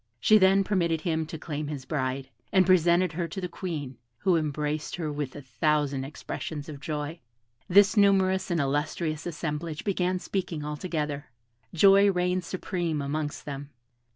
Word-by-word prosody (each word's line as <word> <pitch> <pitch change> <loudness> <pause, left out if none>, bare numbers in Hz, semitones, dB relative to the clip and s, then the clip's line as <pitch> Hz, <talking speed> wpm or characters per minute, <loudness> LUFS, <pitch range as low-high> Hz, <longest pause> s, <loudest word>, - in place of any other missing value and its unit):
She 215 - +6
then 195 +1 +5
permitted 170 -5 +1
him 160 -1 -1
to 160 - -6
claim 150 -1 -4
his 145 -3 -5
bride, 130 -3 -2 0.2
and 190 -1 +5
presented 175 0 +4
her 170 +1 -2
to 190 - -6
the 180 - -3
Queen, 150 -9 -5 0.2
who 185 +5 +2
embraced 150 -1 -1
her 160 -4 -3
with 145 -3 -4
a 145 - -8
thousand 135 +2 0
expressions 150 +1 -6
of 150 -3 -8
joy. 150 +2 -4 0.5
This 200 +3 +6
numerous 190 -2 +3
and 170 -2 +1
illustrious 150 +3 -1
assemblage 155 -1 -4
began 185 -2 0
speaking 180 -5 -3
all 150 0 -3
together. 150 -3 -3 0.4
Joy 195 +3 +6
reigned 180 0 0
supreme 175 -3 -2
amongst 145 +1 -3
them. 140 0 -6
160 Hz, 155 wpm, -27 LUFS, 145-185 Hz, 0.5 s, She